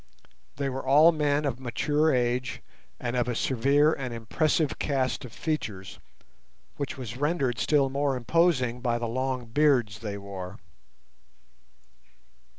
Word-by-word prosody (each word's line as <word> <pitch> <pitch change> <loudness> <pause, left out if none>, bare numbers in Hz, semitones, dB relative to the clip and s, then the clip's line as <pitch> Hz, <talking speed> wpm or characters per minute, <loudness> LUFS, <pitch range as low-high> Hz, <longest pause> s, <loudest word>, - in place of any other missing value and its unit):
They 140 -1 -2
were 135 0 -4
all 150 +5 +6
men 150 -2 0
of 130 -3 -2
mature 145 +5 +1
age 125 0 -1 0.4
and 120 0 -3
of 125 -1 +1
a 120 - -1
severe 140 +6 +3
and 130 -3 -4
impressive 145 +6 0
cast 135 -2 -1
of 120 - -10
features, 105 -11 -4 0.8
which 140 - -4
was 125 -2 -6
rendered 140 -5 0
still 145 -3 +3
more 140 0 0
imposing 125 -3 +1
by 120 -2 0
the 120 0 -3
long 130 +1 -2
beards 120 -4 +2
they 105 -2 -5
wore. 100 -1 -7
130 Hz, 135 wpm, -27 LUFS, 120-145 Hz, 0.8 s, all